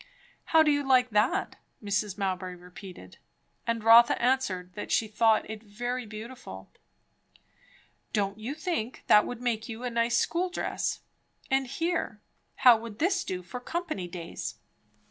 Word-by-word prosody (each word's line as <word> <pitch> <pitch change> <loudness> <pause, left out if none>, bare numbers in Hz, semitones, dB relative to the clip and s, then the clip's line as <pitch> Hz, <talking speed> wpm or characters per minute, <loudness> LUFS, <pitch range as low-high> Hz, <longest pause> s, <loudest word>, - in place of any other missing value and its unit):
"How 320 -1 +5
do 305 - +3
you 290 0 +2
like 255 -3 +3
that?" 235 - +1 0.3
Mrs. 205 -1 -1
Mowbray 185 -2 -2
repeated; 180 - -12 0.5
and 230 -1 -1
Rotha 230 +1 +7
answered 220 -8 0
that 205 - -6
she 225 - +2
thought 220 0 +3
it 220 -1 -7
very 240 +3 -4
beautiful. 215 - -9 1.4
"Don't 200 0 -1
you 245 +7 -4
think 310 -8 -3
that 210 - +6
would 245 -1 -6
make 230 -1 -1
you 225 +2 -6
a 250 - -2
nice 235 +1 +1
school 355 +7 0
dress? 360 - -2 0.5
and 270 0 +2
here 330 -5 -2 0.5
how 245 -2 +10
would 225 -2 -9
this 360 - +1
do 180 -1 -4
for 215 +8 -7
company 310 - -4
days?" 170 - -6
230 Hz, 145 wpm, -28 LUFS, 205-260 Hz, 1.4 s, how